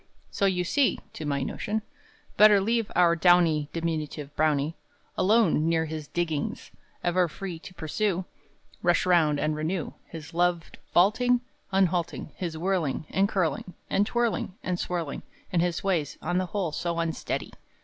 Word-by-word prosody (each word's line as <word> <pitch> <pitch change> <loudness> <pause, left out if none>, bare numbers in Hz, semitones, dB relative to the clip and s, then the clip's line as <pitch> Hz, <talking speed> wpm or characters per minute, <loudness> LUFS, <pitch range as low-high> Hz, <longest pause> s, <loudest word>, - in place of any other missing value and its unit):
So 200 - +2
you 180 -2 +1
see 275 +10 +2 0.2
(to 155 - -5
my 140 -1 0
notion), 215 - -3 0.5
Better 210 -1 +7
leave 225 +2 0
our 170 -1 +5
downy 165 -4 +4
Diminutive 155 -3 -3
browny 155 0 +1 0.4
Alone, 185 -5 +3
near 165 -1 +2
his 155 -1 -6
"diggings;" 160 -4 -3 0.3
Ever 175 0 +2
free 175 0 -6
to 185 - -11
pursue, 180 +3 -1 0.6
Rush 175 0 +3
round, 160 -5 +3
and 155 0 0
renew 160 +2 -2
His 160 0 -9
loved 175 -1 0
vaulting 240 +7 +4 0.3
Unhalting, 180 -3 0
His 170 -3 -4
whirling, 170 -5 -1
And 195 +1 +2
curling, 180 -1 -1 0.2
And 205 +1 +2
twirling, 235 -5 -1
And 180 -1 -2
swirling, 170 -5 -3 0.3
And 170 - +3
his 175 +2 -1
ways, 170 -7 0
on 175 +2 0
the 185 - -1
whole 185 -4 -2
So 170 +3 -2
unsteady! 165 -1 -2
175 Hz, 150 wpm, -27 LUFS, 160-190 Hz, 0.6 s, Better